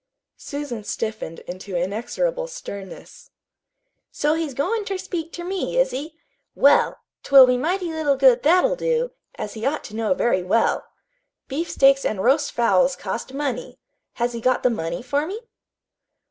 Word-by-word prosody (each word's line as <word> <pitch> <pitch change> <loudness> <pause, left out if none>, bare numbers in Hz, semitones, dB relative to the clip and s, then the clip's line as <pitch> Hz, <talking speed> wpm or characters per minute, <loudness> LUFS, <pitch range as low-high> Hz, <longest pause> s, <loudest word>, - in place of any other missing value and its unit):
Susan 285 -7 -5
stiffened 215 -6 -4
into 185 +1 -7
inexorable 240 - -2
sternness. 200 - -10 0.8
"So 295 +1 +1
he's 320 -5 -3
goin' 425 - 0
ter 395 -1 -3
speak 335 -3 -5
ter 345 - -7
me, 380 +6 -3
is - - +3
he? 300 +5 -6 0.4
Well, 285 +1 +4 0.2
't - - -12
will 270 -2 +10
be 250 0 +2
mighty 345 +6 -1
little 305 -3 +1
good 260 -2 +5
that'll 365 +11 +4
do, - - 0 0.2
as 210 - -5
he 220 - -8
ought 285 +4 -1
to 210 - -9
know 225 +4 +1
very 235 -8 +1
well. 190 +6 +1 0.6
Beefsteaks 275 -2 +3
an' 210 - -1
roast 275 +8 +2
fowls 235 +3 +3
cost 260 +3 -5
money. 275 -4 -3 0.4
Has 240 0 -1
he 235 - -5
got 255 +1 +1
the 250 - +4
money 170 -2 -3
for 285 +4 -1
me?" 405 +5 -5
275 Hz, 160 wpm, -23 LUFS, 230-330 Hz, 0.8 s, will